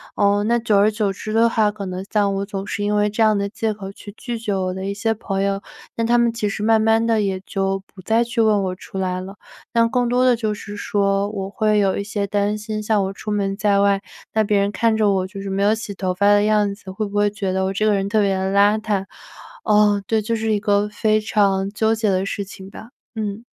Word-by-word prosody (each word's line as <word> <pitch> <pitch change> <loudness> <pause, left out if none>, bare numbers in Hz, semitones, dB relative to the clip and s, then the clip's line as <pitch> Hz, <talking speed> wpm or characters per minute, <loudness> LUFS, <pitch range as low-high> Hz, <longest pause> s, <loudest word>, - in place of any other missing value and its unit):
嗯， 205 0 +2
那 235 +1 +3
久 225 -3 +1
而 205 +2 +5
久 210 -2 -1
之 215 +2 -7
的 225 +1 +4
话 220 -2 +2
可 205 -1 -6
能 185 0 -5
像 205 -2 +2
我 195 0 -2
总 195 -1 -5
是 205 0 -3
因 210 0 0
为 210 0 +3
这 215 +2 -2
样 215 -1 +4
的 200 - -1
借 220 +1 -2
口 195 -2 -7
去 205 +1 -11
拒 240 -2 -5
绝 210 -3 -2
我 185 -1 -1
的 190 0 -6
一 200 +1 -3
些 225 +2 0
朋 195 -2 -3
友， 200 0 -1 0.3
但 230 0 -1
他 240 +1 +4
们 235 -1 +2
其 210 -3 -1
实 205 - -4
慢 220 0 +4
慢 225 +1 +3
地 225 -2 +2
也 190 -2 -1
就 195 0 -2
不 190 - -12
再 225 +5 +2
去 235 0 -1
问 215 -3 +3
我 185 -1 -2
出 195 - -10
来 185 -1 -1
了。 195 +2 -9 0.4
那 230 0 +4
更 245 0 0
多 250 +1 +2
的 250 -1 +5
就 220 -2 -2
是 205 0 -8
说 200 -1 0
我 195 -2 -5
会 215 0 +1
有 195 -2 +2
一 200 - -2
些 205 0 -2
担 205 +1 0
心， 215 0 -4
像 210 -1 +1
我 190 0 -3
出 210 - -8
门 205 -1 0
在 200 -1 +2
外， 200 -1 +2 0.3
那 220 - +3
别 205 0 +1
人 200 +1 +1
看 225 +2 +1
着 215 -2 +2
我 190 -1 0
就 195 0 -8
是 195 - -5
没 195 +1 -1
有 210 +2 +4
洗 220 -2 -6
头 185 -1 -2
发 200 +2 0
的 205 0 +4
样 210 -1 +2
子， 195 -2 -10
会 210 +3 -3
不 200 0 -8
会 205 0 +3
觉 200 -2 -3
得 190 0 0
我 190 - -1
这 215 +2 0
个 215 - +3
人 195 -1 0
特 215 +1 +2
别 195 -1 +2
地 190 0 -1
邋 205 +2 +4
遢？ 205 -3 -1 0.6
哦， 210 -1 +4
对， 220 -1 +1
就 230 +2 -2
是 220 0 0
一 205 - +1
个 205 0 +2
非 215 +1 +1
常 200 -2 +1
纠 220 +1 +1
结 220 -2 0
的 190 0 +1
事 200 0 -3
情 190 -1 -11
吧， 220 +3 -11 0.3
嗯。 215 +1 -4
205 Hz, 290 characters per minute, -21 LUFS, 195-220 Hz, 0.6 s, 而